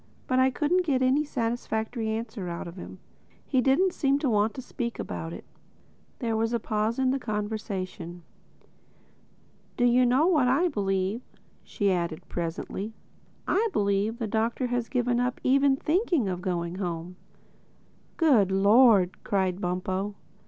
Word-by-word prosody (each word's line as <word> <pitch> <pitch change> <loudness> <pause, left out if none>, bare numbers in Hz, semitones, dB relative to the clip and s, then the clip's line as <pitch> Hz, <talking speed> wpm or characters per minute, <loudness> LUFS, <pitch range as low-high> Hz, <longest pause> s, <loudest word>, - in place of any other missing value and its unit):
"But 255 0 +1
I 260 0 +5
couldn't 320 +7 +1
get 270 -6 +1
any 265 +4 +3
satisfactory 230 -3 -2
answer 220 -4 -4
out 170 0 -5
of 170 - -9
him. 185 - -9 0.5
He 260 -2 +1
didn't 335 +9 +3
seem 275 -1 +2
to 285 -4 0
want 210 +1 +2
to 260 - -5
speak 235 -1 -4
about 165 - -5
it." - - -9 0.7
There 230 -3 -1
was 225 +1 0
a 235 - +1
pause 215 +1 -1
in 260 -1 +2
the 270 - 0
conversation. 205 -6 -4 1.5
"Do 245 - +3
you 245 +1 +4
know 260 +6 +3
what 310 -8 +3
I 295 +8 +3
believe?" 195 - -1 0.4
she 200 -2 0
added 170 -1 -2
presently. 175 +5 -4 0.5
"I 445 +4 +2
believe 200 +2 +1
the 235 - -2
Doctor 225 +4 -1
has 245 -2 -2
given 245 -2 +1
up 250 0 -1
even 275 +1 +4
thinking 325 - +1
of 180 -1 -3
going 175 -1 -2
home." 175 -1 -4 1.0
"Good 245 - +4
Lord!" 200 -1 +5
cried 190 -1 0
Bumpo. 185 +3 -2
225 Hz, 150 wpm, -27 LUFS, 195-260 Hz, 1.5 s, I